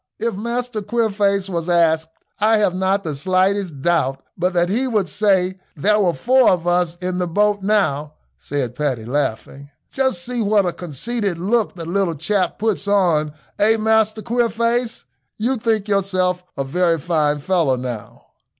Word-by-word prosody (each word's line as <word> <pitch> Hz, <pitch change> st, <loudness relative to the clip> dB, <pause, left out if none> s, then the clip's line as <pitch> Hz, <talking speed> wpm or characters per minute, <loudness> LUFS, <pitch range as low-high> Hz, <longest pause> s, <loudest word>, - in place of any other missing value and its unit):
"If 230 Hz, +1 st, -1 dB
Master 235 Hz, +2 st, -3 dB
Queerface 205 Hz, -3 st, 0 dB
was 170 Hz, -2 st, -3 dB
asked, 160 Hz, -2 st, +3 dB, 0.3 s
I 220 Hz, +1 st, +4 dB
have 205 Hz, -4 st, +2 dB
not 190 Hz, +2 st, 0 dB
the 155 Hz, -3 st, -3 dB
slightest 185 Hz, -1 st, 0 dB
doubt 150 Hz, -6 st, +1 dB, 0.2 s
but 180 Hz, +1 st, 0 dB
that 175 Hz, 0 st, +2 dB
he 240 Hz, +8 st, 0 dB
would 210 Hz, -6 st, 0 dB
say 190 Hz, 0 st, +1 dB, 0.2 s
there 210 Hz, +7 st, +2 dB
were 180 Hz, -5 st, +2 dB
four 255 Hz, 0 st, +4 dB
of 175 Hz, -2 st, +1 dB
us 175 Hz, -1 st, +1 dB
in 180 Hz, 0 st, -2 dB
the 180 Hz, -, 0 dB
boat 205 Hz, +3 st, +1 dB
now," 155 Hz, -8 st, 0 dB, 0.2 s
said 135 Hz, -5 st, -3 dB
Paddy, 130 Hz, -5 st, -2 dB
laughing. 140 Hz, +1 st, -3 dB, 0.2 s
"Just 260 Hz, -10 st, 0 dB
see 245 Hz, -1 st, -2 dB
what 205 Hz, -2 st, +3 dB
a 175 Hz, -, -1 dB
conceited 190 Hz, -, -3 dB
look 210 Hz, +5 st, 0 dB
the 170 Hz, -2 st, -7 dB
little 175 Hz, 0 st, 0 dB
chap 180 Hz, +4 st, -1 dB
puts 210 Hz, -2 st, -1 dB
on; 170 Hz, -7 st, +2 dB, 0.3 s
eh, 220 Hz, +2 st, +4 dB
Master 220 Hz, 0 st, +1 dB
Queerface, 235 Hz, 0 st, 0 dB, 0.3 s
you 240 Hz, +5 st, 0 dB
think 220 Hz, -3 st, 0 dB
yourself 185 Hz, -3 st, 0 dB
a 140 Hz, -, 0 dB
very 170 Hz, +4 st, +1 dB
fine 155 Hz, -2 st, 0 dB
fellow 160 Hz, -4 st, +1 dB
now." 125 Hz, -4 st, -7 dB
185 Hz, 160 wpm, -20 LUFS, 165-215 Hz, 0.3 s, I